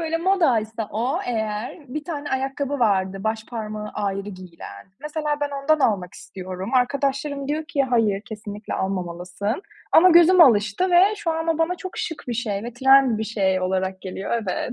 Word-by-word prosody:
Böyle, 325 0 -1
modaysa 235 - +1
o 235 +5 -1
eğer, 220 +1 -3
bir 300 +4 -5
tane 290 -3 -5
ayakkabı 270 +2 -2
vardı, 195 -5 +1
baş 220 0 -1
parmağı 215 -2 -5
ayrı 200 -1 -3
giyilen. 180 - -11
Mesela 300 0 -2
ben 290 0 -1
ondan 310 +2 +3
almak 195 -8 0
istiyorum. 185 +4 -7
Arkadaşlarım 280 +2 0
diyor 310 +2 -1
ki, 305 -3 0
"Hayır, 225 -6 +1
kesinlikle 210 -1 -6
almamalısın." 185 - -3 0.3
Ama 365 +3 +7
gözüm 345 +2 +7
alıştı 230 - +4
ve 370 +4 +5
şu 410 -5 -2
anda 325 0 -1
bana 330 +2 +1
çok 375 0 -8
şık 325 - -4
bir 240 - -1
şey 215 -4 -2
ve 240 - -6
trend 265 -1 +4
bir 220 - -2
şey 195 -4 0
olarak 190 0 -1
geliyor. 190 +1 -6
Evet. 205 +5 -3
235 Hz, 165 wpm, -23 LUFS, 200-295 Hz, 0.3 s, Ama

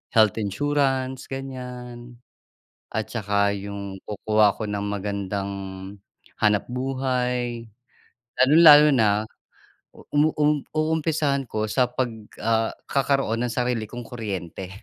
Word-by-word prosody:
health 110 -1 +4
insurance 130 +4 -1
ganiyan, 125 -2 -7 0.8
at 110 0 -2
saka 100 -2 0
yung 100 -1 -6
kukuha 105 0 +2
ako 110 - -5
ng 105 -1 -3
magandang 100 -1 -3 0.9
hanapbuhay. 125 +1 0 0.8
Lalong-lalo 150 +2 +8
na 110 -2 +2 0.7
uum 150 +2 0 0.4
uumpisahan 155 -3 0
ko 110 -1 -3
sa 125 -2 +3
'pag, 125 0 -2 0.3
ah, 115 0 +1 0.2
kakaroon 135 -4 +1
ng 115 - -4
sarili 120 -3 -1
kong 120 +3 -8
kuryente. 95 -6 -6
120 Hz, 95 wpm, -24 LUFS, 105-135 Hz, 0.9 s, Lalong-lalo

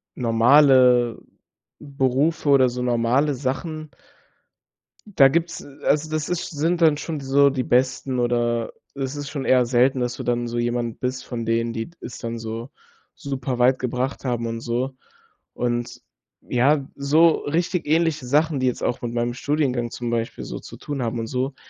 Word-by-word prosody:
normale 125 0 +4 0.6
Berufe 140 +3 0
oder 130 -2 +5
so 125 +1 -5
normale 125 +4 +1
Sachen 150 +4 -4 1.2
da 150 -10 +5
gibt's, 165 +2 -1
äh, 140 -1 -14
also, 155 +1 +1
das 155 -1 -2
ist 180 -1 -3
sind 165 +3 0
dann 155 -2 +5
schon 155 0 -5
so 140 +1 +4
die 130 -2 -1
Besten, 130 +1 0
oder 120 -1 0 0.2
es 135 0 -4
ist 145 -1 -5
schon 140 -3 -4
eher 130 -1 +4
selten, 130 +2 +2
dass 125 0 -2
du - - -6
dann 120 0 -1
so 120 - -3
jemand 120 -1 -2
bist 130 0 -3
von 120 -2 -5
denen, 115 +1 0
die 115 +6 -5
das 125 - -8
dann 115 -1 -5
so 115 +3 -6 0.4
super 130 -2 -4
weit 125 +1 +4
gebracht 130 +2 -3
haben 120 -2 -1
und 115 0 -4
so. 125 +3 -3 0.6
Und 120 -1 -2 0.4
ja, 135 +3 +2
so 155 +4 +4 0.2
richtig 170 +3 -1
ähnliche 155 -3 +1
Sachen, 150 +2 +2
die 130 - +1
jetzt 125 - -1
auch - - -1
mit 120 -1 -3
meinem 120 0 -1
Studiengang 130 -4 -1
zum 120 0 -5
Beispiel 115 -1 -3
so - - -6
zu - - -11
tun 140 -3 -5
haben 115 0 -2
und 115 - -3
so, 130 +3 -2
130 Hz, 170 wpm, -23 LUFS, 120-145 Hz, 1.2 s, oder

